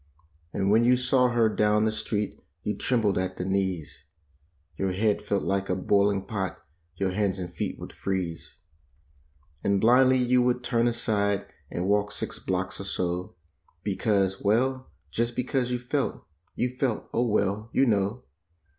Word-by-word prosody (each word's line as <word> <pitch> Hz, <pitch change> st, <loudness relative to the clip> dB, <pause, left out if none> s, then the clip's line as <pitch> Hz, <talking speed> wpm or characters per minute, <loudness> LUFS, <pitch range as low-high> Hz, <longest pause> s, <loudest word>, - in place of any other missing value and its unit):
And 95 Hz, +2 st, 0 dB
when 110 Hz, +2 st, +5 dB
you 125 Hz, +1 st, +5 dB
saw 125 Hz, 0 st, +3 dB
her 120 Hz, -2 st, +3 dB
down 105 Hz, 0 st, +2 dB
the 110 Hz, -, +2 dB
street 105 Hz, -1 st, -2 dB, 0.2 s
you 105 Hz, -, -1 dB
trembled 110 Hz, -7 st, +1 dB
at 95 Hz, 0 st, -3 dB
the 90 Hz, -, -3 dB
knees; 95 Hz, -8 st, -2 dB, 0.7 s
Your 95 Hz, -1 st, -1 dB
head 105 Hz, +2 st, +1 dB
felt 100 Hz, -1 st, -1 dB
like 95 Hz, 0 st, -1 dB
a 90 Hz, -, +2 dB
boiling 100 Hz, +1 st, +2 dB
pot; 95 Hz, -4 st, -3 dB, 0.4 s
your 95 Hz, +1 st, -1 dB
hands 100 Hz, 0 st, 0 dB
and 90 Hz, -2 st, -6 dB
feet -, -, -3 dB
would -, -, -9 dB
freeze. 90 Hz, -4 st, -4 dB, 1.1 s
And 100 Hz, 0 st, +2 dB
blindly 130 Hz, +4 st, +5 dB
you 125 Hz, 0 st, +3 dB
would 125 Hz, 0 st, +1 dB
turn 120 Hz, -1 st, +2 dB
aside 100 Hz, -4 st, +1 dB, 0.2 s
and 90 Hz, -, -3 dB
walk 105 Hz, 0 st, +2 dB
six -, -, -3 dB
blocks 90 Hz, 0 st, -2 dB
or -, -, -6 dB
so. 90 Hz, -1 st, -2 dB, 0.5 s
Because—well, 105 Hz, +5 st, +1 dB, 0.2 s
just 120 Hz, +1 st, -1 dB
because 125 Hz, 0 st, 0 dB
you 125 Hz, -, 0 dB
felt— 120 Hz, 0 st, -2 dB, 0.3 s
you 125 Hz, 0 st, -1 dB
felt—oh, 120 Hz, -1 st, 0 dB
well, 105 Hz, 0 st, 0 dB
YOU 135 Hz, -, +3 dB
KNOW. 105 Hz, +1 st, 0 dB
105 Hz, 155 wpm, -27 LUFS, 95-120 Hz, 1.1 s, when